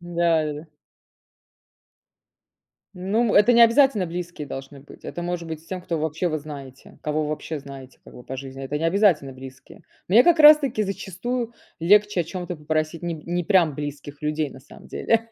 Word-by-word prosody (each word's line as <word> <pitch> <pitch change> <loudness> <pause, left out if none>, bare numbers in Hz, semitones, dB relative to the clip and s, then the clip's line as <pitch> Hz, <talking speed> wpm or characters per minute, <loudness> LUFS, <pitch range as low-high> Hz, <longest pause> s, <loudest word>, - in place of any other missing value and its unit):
Да 175 0 0 0.2
да 150 - -3
да. 150 +3 -9 2.3
Ну, 210 +5 0
это 210 +4 +6
необязательно 235 -2 +5
близкие 170 -3 -6
должны 135 +1 -8
быть. 140 - -16
Это 175 - -6
может 175 -1 -3
быть 160 -1 -6
с - - -23
тем, 185 0 -5
кого 170 -3 -3
вообще 160 +3 -1
вы 155 - -2
знаете. 140 -3 -11
Кого 155 0 -1
вы 150 - -3
вообще 155 0 -4
знаете 135 -2 -12
как - - -14
бы 125 - -12
по 130 - -6
жизни. 135 0 -8
Это 145 +2 -3
необязательно 165 -5 +2
близкие. 130 0 -13 0.3
Мне 230 +7 +6
как 340 -2 +4
раз 300 0 +10
таки 265 -7 -1
зачастую 225 +5 -4 0.3
легче 205 +2 +4
о - - -1
чём-то 180 0 -6
попросить 155 +2 -2
не 170 -1 -2
п 155 - -11
не 175 -1 -1
прям 175 -7 +3
близких 145 0 -7
людей 150 -1 -1
на 130 - -12
самом 135 - -16
деле. 230 0 0
165 Hz, 185 wpm, -23 LUFS, 150-195 Hz, 2.3 s, раз